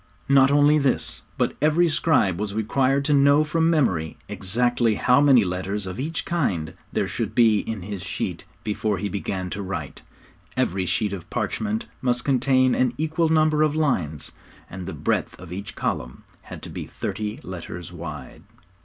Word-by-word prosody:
Not 135 -1 +6
only 145 +1 +5
this, 135 -3 0 0.2
but - - 0
every 155 +3 +4
scribe 130 - +2
was 105 -1 -3
required 135 +5 +1
to 150 - +2
know 140 +1 +5
from 160 +2 +1
memory 95 - +1
exactly 120 +2 +1
how 125 +6 +4
many 135 -6 +6
letters 95 +2 -3
of 95 +4 -6
each 160 +5 -3
kind 95 - -1 0.2
there - - 0
should - - -4
be 110 -3 +5
in 110 -4 -5
his 100 -1 -5
sheet - - -4 0.2
before 105 -1 -1
he 100 +3 -3
began 95 -2 -3
to 100 - -3
write. 85 -7 -5 0.6
Every 95 0 0
sheet 105 +2 0
of 90 -3 -7
parchment 215 - -2 0.2
must 120 -1 0
contain 130 -1 +3
an 125 -1 +1
equal 160 +1 0
number 155 -1 +3
of 155 -1 +2
lines, 90 - -1 0.4
and 90 -1 -7
the 95 - -4
breadth 75 - -1
of 90 -1 -9
each 100 +2 -6
column 60 +1 -3 0.2
had - - -10
to - - -8
be - - -6
thirty 105 0 -4
letters 90 -1 -7
wide. 75 -6 -8
115 Hz, 170 wpm, -24 LUFS, 95-145 Hz, 0.6 s, Not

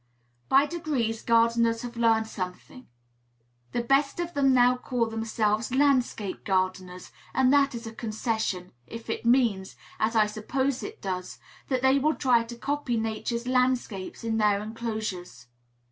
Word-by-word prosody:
By 275 +2 +5
degrees 285 -9 -2
gardeners 230 0 +2
have 245 0 -7
learned 225 -1 +3
something. 195 +5 -7 0.8
The 240 - -1
best 275 +5 +2
of 345 0 -3
them 275 -3 +3
now 250 -1 +5
call 250 -1 -1
themselves 225 0 -1
"landscape 255 -8 +1
gardeners;" 185 -1 -2 0.2
and 260 0 +4
that 280 -2 +3
is 230 0 -7
a 225 - -7
concession, 220 -5 -3 0.2
if 230 0 -7
it 230 - -3
means, 230 -7 +2 0.2
as 225 +2 0
I 215 -1 +5
suppose 250 +5 -2
it 430 +2 -8
does, 185 -1 -4 0.3
that 260 -2 -1
they 265 +1 +4
will 305 +3 +1
try 245 -4 +3
to 235 +1 -9
copy 280 -2 -2
Nature's 225 +2 -2
landscapes 250 -7 -1
in 225 -1 -1
their 210 -2 +3
enclosures. 215 - -5
230 Hz, 145 wpm, -27 LUFS, 215-260 Hz, 0.8 s, By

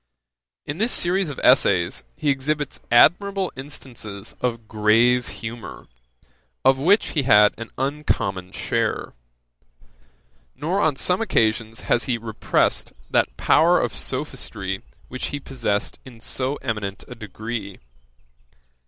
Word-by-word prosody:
In 145 +4 -5
this 230 +3 +1
series 180 0 +2
of 145 - -6
essays 90 - +3
he 145 - +1
exhibits 145 +1 -2
admirable 190 - +4
instances 120 -7 -7
of 115 -3 -2
grave 115 +4 +3
humour, 115 0 -8 0.8
of 135 0 +5
which 195 +9 +3
he 150 - 0
had 105 -5 +6
an 115 - -6
uncommon 125 -10 -2
share. - - -2 1.4
Nor 170 +8 -1
on 155 -6 +2
some 180 +8 +2
occasions 115 - 0
has 120 - +1
he 125 -3 0
repressed 110 -1 0 0.2
that - - +1
power - - +4
of - - -2
sophistry 95 0 -3 0.3
which 130 - -4
he 145 - -4
possessed 120 -7 -2
in 125 -3 -13
so 130 +4 -1
eminent 105 -4 -3
a - - -8
degree. 110 -2 -6
120 Hz, 120 wpm, -23 LUFS, 110-145 Hz, 1.4 s, had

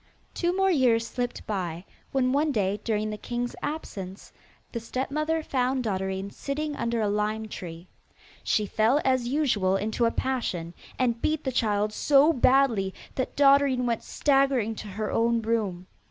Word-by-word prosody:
Two 350 +1 0
more 385 0 +3
years 245 -7 +3
slipped 245 0 -4
by, 180 -4 -3 0.3
when 255 -2 +2
one 295 +3 +2
day 205 -4 0
during 215 -1 -1
the 210 - -6
king's 240 0 -3
absence 195 -11 -6 0.4
the 235 - -3
stepmother 305 +7 -2
found 255 -2 0
Dotterine 190 -2 -2
sitting 295 +4 -3
under 235 -3 -1
a 210 - +1
lime 210 +1 -1
tree. 170 -3 -8 0.6
She 215 - +1
fell 220 +7 +2
as 260 -2 +2
usual 240 -9 +1
into 215 +4 0
a 230 - +2
passion, 185 -12 -2 0.2
and 235 -2 0
beat 310 0 0
the 265 - -1
child 210 -3 +1
so 290 +6 +4
badly 245 -7 +3 0.2
that 260 - -3
Dotterine 275 -2 +4
went 235 -2 0
staggering 270 -6 +2
to 215 - -7
her 210 +2 -4
own 230 0 +2
room. 210 -6 -1
235 Hz, 155 wpm, -27 LUFS, 210-270 Hz, 0.6 s, so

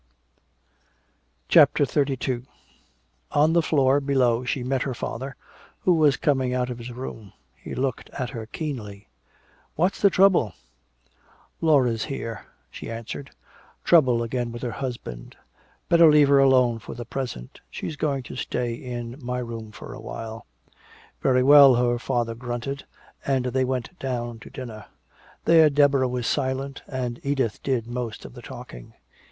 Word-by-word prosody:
CHAPTER 145 - +6
XXXII 130 -3 -1 0.9
On 155 +2 +4
the 170 - +4
floor 140 -3 +3
below 130 -4 +2
she 125 +1 -2
met 130 +1 -1
her 130 -3 -2
father, 135 +4 -5 0.5
who 180 - +4
was 150 -5 +4
coming 130 -3 +1
out 125 0 -1
of 120 - -6
his 120 +1 -7
room. 115 -5 -8 0.2
He - - -8
looked 130 -1 -2
at 125 -2 -4
her 115 -4 -6
keenly: 110 -9 -6 0.7
"What's 180 +5 0
the 200 - +6
trouble?" 185 - +3 1.1
"Laura's 130 -8 +3
here," 115 -8 -6 0.2
she - - -8
answered. 115 +4 -6 0.5
"Trouble 130 -9 +4
again 120 0 -2
with 120 +1 -8
her 120 - -2
husband. 120 - -6 0.5
Better 170 -1 +7
leave 150 -2 +5
her 140 -1 +6
alone 130 -4 +4
for - - -9
the 120 - -7
present 120 - -6
she's 155 - -5
going 140 -3 -1
to - - -9
stay 125 -1 -2
in 120 +2 -7
my 125 +1 -2
room 115 -3 -6
for - - -10
a - - -9
while." 115 -1 -7 0.7
"Very 130 -1 +3
well," 140 -1 +8
her 120 0 +1
father 120 -2 -1
grunted, 120 +3 -5 0.4
and 135 -2 0
they 130 +1 +1
went 130 +7 -3
down 120 -3 -3
to - - -12
dinner. 115 -5 -8 0.6
There 160 -2 +6
Deborah 140 -2 +3
was 125 -1 -3
silent, 135 +1 -2
and 125 -3 -4
Edith 135 -6 -1
did 130 -4 -1
most 120 -2 -5
of - - -10
the - - -11
talking. - - -10
125 Hz, 150 wpm, -24 LUFS, 120-140 Hz, 1.1 s, well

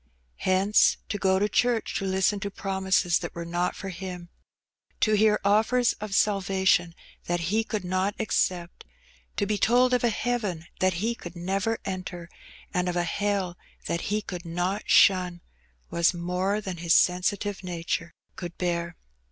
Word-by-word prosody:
Hence, 190 +3 +3
to 205 - -2
go 190 -1 +3
to 205 +2 +2
church 240 +1 +1
to 195 - -3
listen 190 +2 +1
to 200 - -3
promises 190 -3 +1
that 175 - -7
were 170 0 -5
not 175 +1 -1
for 195 - -6
him, 180 -1 -7 0.7
to 215 - +3
hear 210 0 +4
offers 225 +4 +3
of 210 -2 -3
salvation 190 -4 +2 0.3
that 175 0 -1
he 225 +1 +3
could 215 -4 -4
not 185 +3 0
accept, 180 -5 -1 0.5
to 205 - +1
be 210 0 -1
told 250 +2 +4
of 250 - +2
a 240 - +4
heaven 210 -7 -2
that 185 -1 +2
he 235 - +1
could 175 -6 -10
never 195 +6 -1
enter, 180 -2 -5 0.4
and 180 0 0
of 175 - -3
a 175 - +1
hell 190 0 -1 0.3
that 170 - -2
he 210 +1 0
could 180 -3 -6
not 180 +4 -2
shun, 180 -3 +4 0.5
was 170 +1 +2
more 180 +4 -1
than 190 -3 -5
his 165 -1 +2
sensitive 190 +2 +1
nature 170 -1 -3 0.2
could 175 -2 -7
bear. 170 -1 -2
190 Hz, 160 wpm, -26 LUFS, 175-205 Hz, 0.7 s, hear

